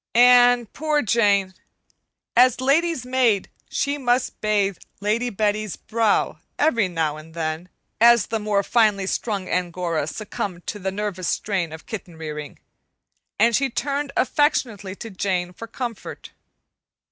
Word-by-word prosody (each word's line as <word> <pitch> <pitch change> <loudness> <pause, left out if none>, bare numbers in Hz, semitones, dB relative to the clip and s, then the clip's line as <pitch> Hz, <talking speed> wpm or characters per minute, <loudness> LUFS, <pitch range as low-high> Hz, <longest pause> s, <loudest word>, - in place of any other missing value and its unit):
And, 245 -1 +6
poor 305 -1 0
Jane! 200 -4 +2 0.8
As 250 +1 +5
lady's 280 +1 +1
maid 250 -6 +1 0.2
she 285 0 -1
must 250 -1 0
bathe 205 -3 +1 0.2
Lady 220 +4 0
Betty's 210 -1 -1
brow 225 -2 0 0.2
every 235 -10 +2
now 160 -4 -1
and 160 +1 -13
then, 160 +2 -3 0.3
as 235 -2 +6
the 225 - -2
more 210 -1 0
finely 210 -3 +2
strung 200 -1 -2
Angora 175 -3 -1
succumbed 190 -2 -5
to 210 - -5
the 190 0 -2
nervous 195 -3 -3
strain 185 -6 -1
of 160 0 -10
kitten 180 -6 -7
rearing, 150 -2 -7 0.8
and 230 +2 +4
she 275 +2 +1
turned 280 +3 -2
affectionately 245 -9 +1
to 225 +2 -8
Jane 180 -2 -2
for 230 - -9
comfort. 235 -1 -6
210 Hz, 135 wpm, -23 LUFS, 185-245 Hz, 0.8 s, And